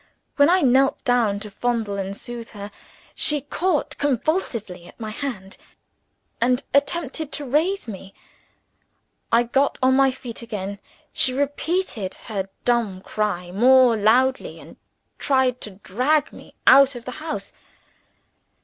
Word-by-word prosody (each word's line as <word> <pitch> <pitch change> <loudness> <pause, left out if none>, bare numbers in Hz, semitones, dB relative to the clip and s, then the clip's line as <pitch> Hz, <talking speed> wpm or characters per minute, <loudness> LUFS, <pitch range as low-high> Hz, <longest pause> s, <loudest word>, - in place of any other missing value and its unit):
When 285 +2 +5
I 370 +1 +4
knelt 270 +1 +3
down 235 -5 +2
to 210 -1 -8
fondle 225 -1 -2
and 195 +1 -4
soothe 240 -1 -8
her, 200 +1 -7 0.4
she 295 -1 +3
caught 320 +3 -1
convulsively 235 - -2
at - - -17
my 220 -2 -5
hand, 215 -7 -6 0.8
and 250 +3 +2
attempted 290 +1 0
to 290 - -4
raise 315 +7 0
me. 195 -2 -9 1.2
I 230 +1 +5
got 270 +4 +1
on 260 -1 +3
my 270 0 +5
feet 250 -3 -7
again. 200 -3 -5 0.3
She 255 - +2
repeated 285 - -2
her 195 -3 -5 0.2
dumb 230 -6 0
cry 190 -4 -3
more 250 +4 +5
loudly 245 +5 +2
and - - -14 0.4
tried 260 -2 +1
to - - -5
drag 250 +10 0
me - - -14
out 275 -1 +7
of 240 - -9
the 255 - -5
house. 315 -1 -5
245 Hz, 135 wpm, -22 LUFS, 210-280 Hz, 1.2 s, out